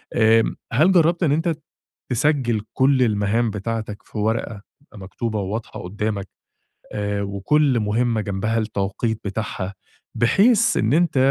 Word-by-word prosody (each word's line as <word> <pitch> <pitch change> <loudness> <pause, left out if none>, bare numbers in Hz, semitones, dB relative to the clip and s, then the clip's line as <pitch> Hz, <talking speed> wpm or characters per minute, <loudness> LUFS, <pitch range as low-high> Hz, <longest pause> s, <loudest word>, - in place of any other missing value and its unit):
آمم، 115 -1 +4 0.2
هل 155 +10 +4
جربت 175 0 +3
إن 155 - +3
أنت 165 +2 +1 0.6
تسجل 125 -4 +1
كل 130 0 +3
المهام 110 +1 +1
بتاعتك 110 0 -4
في - - -11
ورقة 110 -1 -1 0.3
مكتوبة 105 +3 -4
وواضحة 105 +4 -5
قدامك، 100 +1 -3 0.7
آآ 105 -1 -2
وكل 120 +7 +1
مهمة 110 +2 0
جنبها 105 +3 -2
التوقيت 110 +1 -2
بتاعها؟ 100 -1 -4 0.4
بحيث 210 - +3
إن 110 +4 +1
أنت 170 -2 +2
110 Hz, 120 wpm, -22 LUFS, 105-135 Hz, 0.7 s, آمم